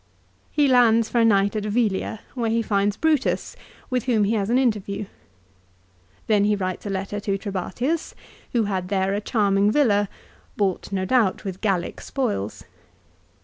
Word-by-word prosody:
He 295 -2 +2
lands 230 -3 +4
for 240 - +1
a - - +5
night 200 -1 +3
at 210 - -1
Velia, 215 -1 -1
where 235 -3 -1
he 230 +1 +1
finds 200 -1 0
Brutus, 310 -4 0 0.4
with 250 -2 0
whom 230 -5 +2
he 205 +3 +1
has 205 -2 0
an 245 - +3
interview. 210 -5 0 1.2
Then 210 -2 +3
he 210 0 +3
writes 185 0 -4
a - - -3
letter 195 +1 -3
to 195 -1 -1
Trebatius, 225 - -3 0.4
who 235 -2 +3
had 190 -3 -2
there 195 0 0
a 205 - -1
charming 200 -2 +2
villa, 210 -6 +2 0.5
bought 195 -2 -1
no 190 -1 -1
doubt 220 -2 +1
with 190 -1 -5
Gallic 195 -5 -1
spoils. 105 - -3
205 Hz, 160 wpm, -23 LUFS, 195-230 Hz, 1.2 s, a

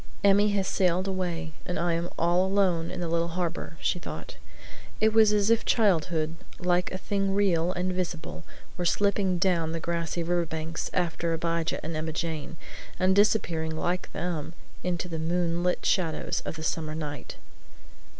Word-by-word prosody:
"Emmy 200 +1 +5
has 200 -2 0
sailed 185 0 +2
away 175 -4 -2
and 180 - -3
I 170 +1 +1
am 170 +1 -1
all 175 +2 +3
alone 190 -4 +2
in - - -5
the 175 - -1
little 170 0 +1
harbor," 170 -1 -3
she 180 - 0
thought. - - -7 0.6
It 220 0 +3
was 220 -1 +6
as 210 +1 +3
if 230 - +3
childhood, 165 -6 +2 0.2
like 180 0 +1
a 185 - -3
thing 195 0 -1
real 180 -4 +3
and 185 0 -1
visible, 170 -3 -4 0.3
were 180 - -2
slipping 200 0 +2
down 170 -3 +1
the 165 - -2
grassy 170 0 -2
river 175 0 +1
banks, 160 +1 -4
after 170 -2 0
Abijah 165 0 -1
and 160 0 -3
Emma 155 0 -2
Jane, 160 0 -3 0.4
and 185 +1 +3
disappearing 165 -6 +2
like 180 +3 -1
them 170 -3 -3 0.3
into 180 0 -1
the 165 -2 -4
moon 170 +1 0
lit 180 0 0
shadows 165 -5 +1
of - - -4
the 160 - -7
summer 155 -1 -2
night. 145 -4 -5
175 Hz, 170 wpm, -28 LUFS, 165-185 Hz, 0.6 s, was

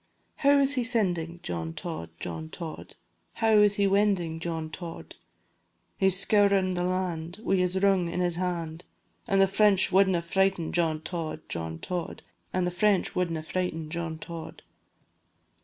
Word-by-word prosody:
How 285 0 +5
is 280 0 +3
he 255 -3 +1
fendin', 175 -8 -1
John 80 -2 -4
Tod, 80 +1 -5
John 80 -2 -5
Tod? 160 - -8 0.4
How 225 -1 +1
is 205 -1 +5
he 200 - +2
wendin', 195 -5 +2
John 160 -1 -4
Tod? 170 0 -8 0.8
He 190 - +3
's 185 - +3
scourin' 200 -2 +3
the 175 - -2
land, 180 -2 -2
Wi' 195 - +2
his 180 +1 +1
rung 190 -3 +3
in 180 - -3
his 175 -1 0
hand, 170 -2 -3 0.4
An' 195 -4 +2
the 195 - +6
French 195 0 +3
wadna 190 -2 +4
frighten 190 -1 +1
John 160 -3 +1
Tod, 160 -2 -4
John 80 -1 -4
Tod, 175 - -5 0.3
An' 185 - 0
the 180 - 0
French 195 +1 +2
wadna 170 -3 -1
frighten 165 -2 -3
John 165 -1 -3
Tod. 165 0 -8
180 Hz, 155 wpm, -28 LUFS, 165-195 Hz, 0.8 s, the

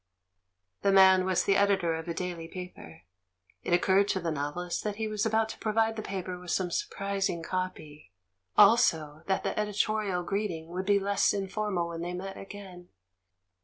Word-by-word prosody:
The 200 - +3
man 190 -1 +6
was 185 -1 +1
the 195 - +2
Editor 195 -5 +2
of 160 +1 -5
a 170 - -2
daily 175 -2 -4
paper; 165 - -10 0.6
it - - -5
occurred 190 +3 +4
to 190 - 0
the 170 -2 -2
novelist 155 +4 -3
that 210 -1 -2
he 220 +1 -2
was 215 +1 -1
about 220 0 +2
to - - -8
provide 225 +1 +1
the 220 - -4
paper 185 -3 -5
with 180 0 -10
some 180 0 0
sur - - -1
prising 195 -4 -2
copy; 155 - -5 0.5
also, 160 -8 +4
that 190 - 0
the - - -2
editorial 210 -3 0
greeting 175 -4 -3
would 185 +2 -4
be 205 -1 +5
less 200 +1 +2
informal 195 -3 -2
when 165 0 -6
they 175 +1 -4
met 195 +2 -6
again. 195 -3 -10
190 Hz, 175 wpm, -29 LUFS, 175-200 Hz, 0.6 s, man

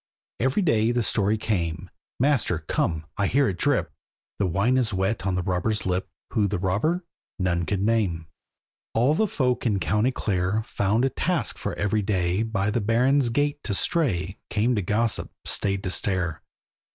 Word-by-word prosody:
Every 135 - +1
day 115 -8 +3
the 120 -1 +1
story 105 0 +1
came, 85 -7 -2 0.3
"Master, 120 - +1
come! 80 -2 0
I 100 - +3
hear 140 +4 +3
it 90 -3 -3
drip!" - - +1 0.5
The 100 - +2
wine 100 +9 +2
is 120 -4 +1
wet 95 +1 -1
on 95 - +1
the 90 - -1
robber's 95 +4 -1
lip, 95 0 -1 0.2
Who 105 -2 +2
the 100 - -1
robber, 105 - 0 0.3
none 85 -3 0
could 100 -2 0
name. 100 -7 +1 0.7
All 125 +6 +4
the 215 +7 +2
folk 125 -9 0
in 105 -5 +1
County 105 +9 +1
Clare 100 -1 -1
Found 110 +2 +1
a - - +2
task 175 +5 -1
for - - -3
every 105 +1 0
day 95 -1 0
By 105 -3 0
the 115 - 0
Baron's 125 +5 +3
gate 145 +4 0
to 100 - -2
stray, 95 - 0
Came 110 +4 +1
to 105 - +1
gossip, 105 +4 0 0.2
stayed 100 -1 0
to 95 - -2
stare. 90 -5 -1
105 Hz, 175 wpm, -25 LUFS, 95-120 Hz, 0.7 s, All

